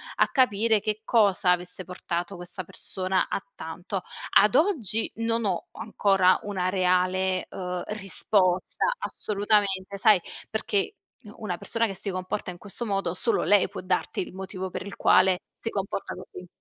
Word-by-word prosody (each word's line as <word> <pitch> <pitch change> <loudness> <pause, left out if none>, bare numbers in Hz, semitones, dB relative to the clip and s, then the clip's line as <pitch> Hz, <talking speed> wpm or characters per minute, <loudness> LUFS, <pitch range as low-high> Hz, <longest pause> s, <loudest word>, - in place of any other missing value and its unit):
a - - +4
capire 225 -4 +3
che 215 +1 -2
cosa 200 -5 +3
avesse 180 +1 -1
portato 175 +1 -4
questa 175 +2 -4
persona 185 +2 -1
a - - -2
tanto. - - -5 0.3
Ad 210 +3 +5
oggi 255 - +1
non 230 0 0
ho 185 -4 +1
ancora 195 -3 +3
una 190 -3 -1
reale, 185 0 +1
uhm, 180 -1 -4
risposta 195 -2 +1
assolutamente, 200 - 0
sai, 200 -2 +5 0.3
perché 220 - -1 0.3
u 210 -2 -12
una 180 -4 -2
persona 230 +6 0
che 195 - -6
si 195 - -2
comporta 185 +1 -3
in 175 - -10
questo 205 +4 -5
modo 195 -5 -1
solo 230 +6 +1
lei 205 -1 +4
può - - -7
darti 185 0 -1
il 180 - -6
motivo 190 0 -5
per 185 - -6
il 200 - -7
quale 185 -1 +4 0.2
si 225 - -3
comporta 195 -2 -3
così. 180 0 -10
195 Hz, 155 wpm, -26 LUFS, 185-210 Hz, 0.3 s, Ad